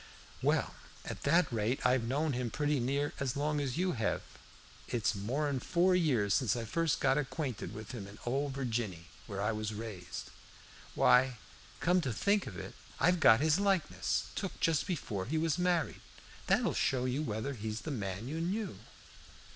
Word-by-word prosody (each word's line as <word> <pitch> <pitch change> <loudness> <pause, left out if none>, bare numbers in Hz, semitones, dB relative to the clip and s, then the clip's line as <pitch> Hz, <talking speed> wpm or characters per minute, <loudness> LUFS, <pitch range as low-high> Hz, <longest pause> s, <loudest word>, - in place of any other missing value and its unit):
"Well, - - +1 0.3
at - - -6
that 165 -1 +3
rate 115 +3 0
I've 125 0 +4
known 145 +5 0
him 125 -1 -1
pretty 145 +4 0
near 140 +4 0
as 140 0 -1
long 150 +1 0
as 135 -1 -2
you 185 +1 +2
hev. 110 - -1 0.6
It's 105 -5 +1
more'n 130 +7 -1
four 180 +7 +3
years 130 - +2
since 110 0 +2
I 115 -1 -3
first 165 +6 +1
got 135 +2 +3
acquainted 135 -4 -3
with 110 +4 -8
him 115 -6 -6
down, 100 - -10
in 105 - -14
Ole 135 +4 0
Virginny, 115 -10 -3 0.2
where 100 -3 -5
I 105 +2 +1
was 110 0 -3
raised. 100 -5 -6 0.6
Why, 125 -1 +5 0.4
come 180 +4 +3
to 135 -6 -2
think 200 - +1
of 95 - -7
it, - - -7 0.3
I've 180 +1 +4
got 115 -5 +7
his 155 +3 +3
likeness, 195 -4 +1
took 195 -2 -4
just 165 +1 +2
before 115 - -2
we 160 - 0
was 160 +1 +1
married. 180 -3 +1 0.5
That'll - - +3
show 130 -1 +1
you 130 +3 0
whether 120 0 -2
he's 110 -2 -4
the 160 - -4
man 100 -3 -3
you 160 +4 -3
knew." 185 - -2
130 Hz, 180 wpm, -33 LUFS, 110-155 Hz, 0.6 s, got